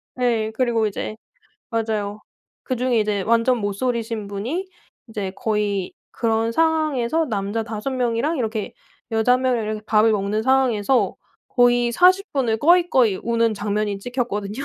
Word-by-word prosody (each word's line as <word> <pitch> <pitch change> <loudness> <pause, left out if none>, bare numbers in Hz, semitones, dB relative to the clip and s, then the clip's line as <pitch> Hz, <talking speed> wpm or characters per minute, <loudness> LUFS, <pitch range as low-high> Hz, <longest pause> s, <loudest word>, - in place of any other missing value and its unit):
네. 230 -3 0
그리고 230 -2 +1
이제 210 +1 -5 0.6
맞아요 215 -2 -2 0.4
그중에 250 -2 0
이제 210 -2 0
완전 230 +3 +2
모솔이신 225 +1 -2
분이 240 - -3 0.4
이제 205 -3 -4
거의 210 -3 -1 0.2
그런 225 0 0
상황에서 315 -1 +1
남자 210 -1 -2
5 220 +4 -4
명이랑 255 +4 0
이렇게 220 -1 -3 0.4
여자 225 +2 +3
1 255 - +2
명이랑 250 -4 +1
이렇게 215 0 -4
밥을 220 +1 +4
먹는 210 +1 -1
상황에서 260 -2 +2 0.3
거의 245 -1 +3
40 370 - +4
분을 240 -6 0
꺼이꺼이 290 - +4
우는 230 -1 +1
장면이 205 0 -2
찍혔거든요. 235 0 -3
230 Hz, 305 characters per minute, -22 LUFS, 215-255 Hz, 0.6 s, 밥을